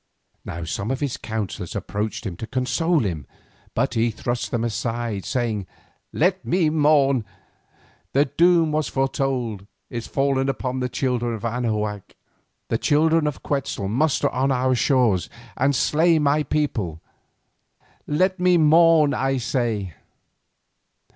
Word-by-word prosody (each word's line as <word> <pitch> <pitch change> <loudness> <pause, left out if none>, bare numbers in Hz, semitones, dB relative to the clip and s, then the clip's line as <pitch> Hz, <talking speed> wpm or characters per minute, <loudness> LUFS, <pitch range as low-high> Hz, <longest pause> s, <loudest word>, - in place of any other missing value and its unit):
Now 85 +1 -6
some 100 +6 -3
of 135 0 -1
his 140 -4 -2
counsellors 110 -4 -5
approached 105 +2 -3
him 95 -4 -4
to 115 - -6
console 135 +7 +1
him, 80 - -3 0.5
but - - 0
he 115 +1 +2
thrust 120 +2 -3
them 120 -2 -1
aside, 115 -2 -3
saying: 110 -6 -2 0.4
"Let 185 +4 +1
me 170 -3 +1
mourn—the 145 -5 +3 1.1
doom 170 -2 +4
that 150 - 0
was 155 - 0
foretold 130 -7 -2 0.2
is 120 -1 -5
fallen 135 -1 +1
upon 130 -1 -2
the 125 0 -1
children 120 -2 -1
of 110 - -7
Anahuac. 105 -4 -2 0.5
The 115 - 0
children 160 +1 +3
of 150 - -4
Quetzal 135 -8 -2
muster 140 +7 +1
on 135 +2 0
our 130 0 +2
shores 120 - +2 0.3
and 140 +2 +1
slay 165 +5 +3
my 150 0 +2
people. 130 - -2 1.1
Let 185 +5 +1
me 180 -1 +4
mourn, 160 -1 +5
I 135 0 0
say." 115 - -2
130 Hz, 135 wpm, -23 LUFS, 115-150 Hz, 1.1 s, mourn